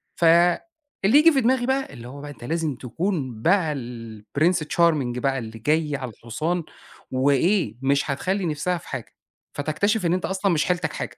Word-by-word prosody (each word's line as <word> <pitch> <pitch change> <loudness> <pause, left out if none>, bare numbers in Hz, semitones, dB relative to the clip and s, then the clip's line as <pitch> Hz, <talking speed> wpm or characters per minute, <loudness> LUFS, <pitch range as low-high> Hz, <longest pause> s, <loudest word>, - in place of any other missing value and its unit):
فاللي 170 +1 +4 0.6
ييجي 330 +2 +7
في 270 -3 +2
دماغي 245 +1 +2
بقى 265 - -1
اللي 120 -1 -9
هو 140 +3 -9
بقى 145 0 -7
أنت 125 - -13
لازم 160 0 -1
تكون 130 - -3
بقى 170 - +2
الPrince 120 - -2
Charming 150 -8 +2
بقى 135 +2 0
اللي 115 -1 -8
جاي 150 +4 +1
على 130 -4 -5
الحصان، 155 - -3 0.5
وإيه، 140 - +2
مش 140 +1 +1
هتخلِّي 185 +7 -1
نِفسها 165 +3 -1
في 165 - -13
حاجة، - - -6 0.4
فتكتشف 180 +8 0
إن 170 - +2
أنت 185 - -1
أصلًا 190 +1 0
مش 160 -3 +2
حيلتك 180 -1 -1
حاجة. - - -5
155 Hz, 170 wpm, -24 LUFS, 130-180 Hz, 0.6 s, ييجي